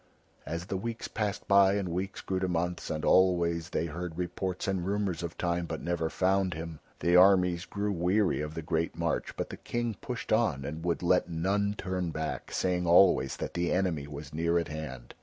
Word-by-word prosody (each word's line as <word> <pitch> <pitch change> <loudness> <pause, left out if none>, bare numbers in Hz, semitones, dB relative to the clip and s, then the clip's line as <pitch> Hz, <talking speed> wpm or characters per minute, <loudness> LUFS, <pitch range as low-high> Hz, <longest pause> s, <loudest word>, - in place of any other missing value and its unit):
As 85 +2 -3
the 95 - -3
weeks 115 +4 -4
passed 105 -1 -3
by 100 0 +6
and 100 -2 -1
weeks 95 +3 -3
grew 95 -1 -2
to 95 - 0
months, 90 0 -2
and 75 -1 -2
always 85 -2 +3
they 85 - -1
heard 85 +1 -5
reports 90 +1 -3
and 95 -2 0
rumours 100 -2 -1
of 85 -1 -5
Time, 85 -1 -1
but 80 -1 -4
never 85 -2 -1
found 95 0 +1
him, 80 -1 -6 0.2
the 85 +1 +3
armies 90 -2 +5
grew 105 0 -2
weary 90 0 +1
of 75 +1 -5
the 80 - -4
great 80 +1 -1
march, - - -1
but - - -3
the - - -7
King 120 -1 -2
pushed 125 -4 -3
on 80 - +1
and 80 +3 -5
would 85 0 -1
let 90 0 +3
none 100 +5 0
turn 90 -2 -2
back, 80 0 -4
saying 90 -1 0
always 85 -6 +5
that - - -4
the 85 0 0
enemy 90 -6 0
was 75 +1 -8
near 85 +2 +1
at 85 - -1
hand. 70 -5 -7
90 Hz, 200 wpm, -30 LUFS, 80-95 Hz, 0.2 s, by